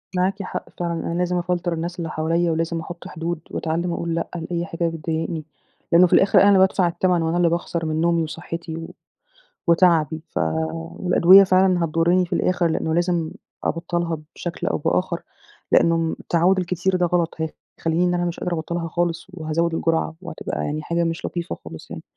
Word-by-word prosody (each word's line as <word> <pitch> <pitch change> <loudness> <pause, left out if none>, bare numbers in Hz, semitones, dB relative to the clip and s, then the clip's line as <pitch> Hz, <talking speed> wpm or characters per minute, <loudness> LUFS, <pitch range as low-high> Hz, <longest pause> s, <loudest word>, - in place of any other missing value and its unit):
معاكِ 190 +2 0
حق - - -5
فعلًا 170 -1 -1
أنا 165 0 -3
لازم 180 0 +1
أفلتر 175 0 -1
الناس 170 +2 -4
اللي 165 -1 -3
حواليَّ، 165 +2 0
ولازم 165 +1 -1
أحط 170 +1 -8
حدود 165 +1 -4
وأتعلِّم 170 +2 -1
أقول 170 -1 -2
لأ 165 - -2
لأي 170 0 -3
حاجة 170 0 -2
بتضايقني. 160 0 -3 0.5
لأنه 175 +1 +7
في - - -2
الآخر 195 - +6
أنا 200 - +6
اللي 200 -1 +6
بادفع 190 -1 +4
التمن 175 0 +1
وأنا 165 +1 0
اللي 175 -1 +4
باخسر 170 0 -2
من 155 0 -1
نومي 170 0 +2
وصحتي 165 +1 -6
و 165 - -6 0.8
وتعبي 165 -3 +3
ف - - -3 0.3
والأدوية 170 - +5
فعلًا 185 -2 +3
هتضُرني 165 +3 +2
في 180 - -5
الآخر، 175 0 +2
لأنه 160 0 -1
لازم 170 -1 0 0.3
أبطّلها 170 0 -1 0.2
بشكل 175 -1 -4
أو - - +1
بآخر، 170 +3 0 0.5
لأنه 165 -1 +3
التعوّد 180 +3 +2
الكتير 180 +1 0
ده 180 -1 +2
غلط 170 -1 0
هيخليني 160 +1 -2
إن 180 - +1
أنا 175 0 0
مش 175 -1 -3
قادرة 180 - -2
أبطّلها 170 +1 -3
خالص 170 +1 -2
وهازوِد 165 0 -1
الجرعة، 165 0 0
وهتبقى 185 - -4
يعني 150 +1 -2
حاجة 170 +2 0
مش 165 0 -2
لطيفة 175 0 -4
خالص 80 - -10
يعني. - - -7
170 Hz, 180 wpm, -22 LUFS, 165-175 Hz, 0.8 s, لأنه